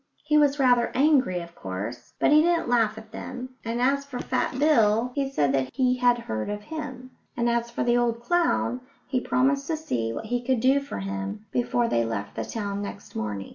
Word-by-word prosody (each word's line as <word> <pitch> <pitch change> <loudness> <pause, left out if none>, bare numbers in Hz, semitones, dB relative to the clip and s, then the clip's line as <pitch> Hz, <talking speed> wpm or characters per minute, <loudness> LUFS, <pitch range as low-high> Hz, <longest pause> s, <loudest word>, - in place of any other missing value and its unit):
He 300 0 +1
was 290 -1 +4
rather 245 -3 +3
angry, 260 - +3
of 170 0 -10
course, 105 - -6
but - - +3
he 305 +1 +7
didn't 340 -2 +2
laugh 225 -3 +2
at 220 0 -11
them, 255 0 -6
and 230 +1 -2
as 275 +3 +2
for 280 -3 -7
Fat 255 - -1
Bill, 240 -5 +3
he 275 0 -1
said 145 - +1
that 135 -1 +1
he 255 -1 +2
had 245 -1 +4
heard 110 - -4
of 205 0 -4
him; 260 -3 -7 0.3
and 235 0 +1
as 235 0 0
for 235 - -2
the 240 0 +3
old 235 -1 +1
clown, 295 -3 +1 0.2
he 260 - 0
promised 275 +3 +1
to 320 - -1
see 115 - -2
what 220 - -5
he 240 +2 -1
could 255 -1 +1
do 265 +4 +4
for 280 - -7
him 95 - -5
before 240 -1 +1
they 115 - +1
left 100 -3 -4
the - - -2
town 200 -2 -4
next 200 0 -8
morning. 105 -3 -4
240 Hz, 215 wpm, -26 LUFS, 200-270 Hz, 0.3 s, he